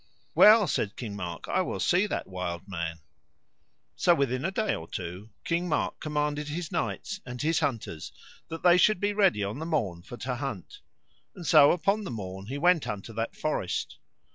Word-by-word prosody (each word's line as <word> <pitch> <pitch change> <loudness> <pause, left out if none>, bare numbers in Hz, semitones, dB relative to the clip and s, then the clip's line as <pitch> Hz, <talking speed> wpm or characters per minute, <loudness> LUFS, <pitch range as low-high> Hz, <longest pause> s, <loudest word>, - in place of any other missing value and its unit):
Well, 215 0 +8
said 105 - -1
King 110 -5 -6
Mark, 90 -4 -6
I - - +1
will 185 - -3
see 185 +4 +3
that - - -3
wild 90 -1 -5
man. 85 -4 -4 0.9
So 175 - +4
within 130 -3 0
a 180 - +1
day 215 +3 0
or 80 - -6
two 90 +4 -6
King 175 +1 -1
Mark 150 - -1
commanded 150 -1 -2
his 160 +3 -4
knights 195 +3 -3
and 125 -1 -7
his 160 +4 +1
hunters 115 - -3 0.4
that 165 0 -7
they 175 0 +7
should 200 +1 +4
be 205 +1 0
ready 195 - +3
on 100 +7 -3
the 160 - -4
morn 105 - -1
for 120 - -10
to 125 0 -3
hunt, 140 - -6 0.6
and 180 -3 -9
so 145 -2 +7
upon 195 +5 +1
the 195 - -5
morn 95 -3 -6
he 135 +4 -4
went 175 +1 +3
unto 105 +2 -5
that 115 +1 -3
forest. 150 -12 -2
145 Hz, 190 wpm, -28 LUFS, -, 0.9 s, Well